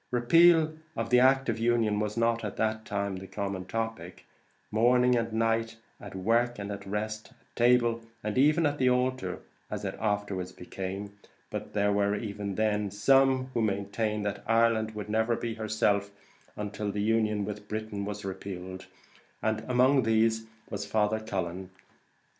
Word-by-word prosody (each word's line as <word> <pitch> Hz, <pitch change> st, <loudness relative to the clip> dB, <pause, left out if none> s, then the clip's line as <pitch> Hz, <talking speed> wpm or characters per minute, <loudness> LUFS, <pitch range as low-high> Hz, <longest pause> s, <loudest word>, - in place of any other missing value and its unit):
Repeal 160 Hz, +6 st, +5 dB, 0.2 s
of 115 Hz, +1 st, -3 dB
the 130 Hz, +2 st, +6 dB, 0.2 s
Union 115 Hz, -3 st, +2 dB
was 105 Hz, +1 st, -2 dB
not, 115 Hz, 0 st, +1 dB
at 105 Hz, -, -4 dB
that 110 Hz, 0 st, -1 dB
time, 100 Hz, -1 st, -2 dB
the 95 Hz, +1 st, -8 dB
common 100 Hz, -2 st, -4 dB
topic, 115 Hz, +3 st, -5 dB, 0.5 s
morning 125 Hz, +3 st, +4 dB
and 115 Hz, -1 st, -1 dB
night, 115 Hz, 0 st, 0 dB, 0.2 s
at 100 Hz, -2 st, -10 dB
work 115 Hz, +5 st, +1 dB
and 100 Hz, 0 st, -5 dB
at 100 Hz, -1 st, -7 dB
rest, 110 Hz, +2 st, -3 dB
at -, -, -35 dB
table 120 Hz, -1 st, +3 dB, 0.2 s
and 105 Hz, 0 st, -2 dB
even 150 Hz, +5 st, +4 dB
at 145 Hz, 0 st, 0 dB
the 130 Hz, -, +4 dB
altar, 125 Hz, -7 st, 0 dB, 0.3 s
as 105 Hz, -1 st, -4 dB
it 95 Hz, -, -3 dB
afterwards 100 Hz, -4 st, -2 dB
became; 95 Hz, +3 st, -6 dB, 0.3 s
but -, -, -5 dB
there 105 Hz, -1 st, +2 dB
were, 100 Hz, 0 st, +2 dB
even 100 Hz, -2 st, -4 dB
then, 105 Hz, -1 st, +1 dB
some 130 Hz, +5 st, +3 dB
who 115 Hz, -, 0 dB
maintained 105 Hz, +1 st, -1 dB
that 105 Hz, -, -3 dB
Ireland 115 Hz, -1 st, +2 dB
would 105 Hz, -1 st, -5 dB
never 110 Hz, +2 st, +1 dB
be 115 Hz, -1 st, -3 dB
herself, 110 Hz, -2 st, 0 dB, 0.6 s
till 105 Hz, 0 st, -3 dB
the 105 Hz, 0 st, -2 dB
Union 110 Hz, -2 st, +1 dB
was 105 Hz, -1 st, -5 dB
repealed; 95 Hz, -1 st, -6 dB, 0.6 s
and 110 Hz, 0 st, 0 dB
among 130 Hz, +2 st, +4 dB
these 110 Hz, 0 st, +2 dB, 0.2 s
was 100 Hz, -1 st, -3 dB
Father 110 Hz, +1 st, +1 dB
Cullen. 95 Hz, -4 st, -4 dB
110 Hz, 150 wpm, -29 LUFS, 100-115 Hz, 0.6 s, the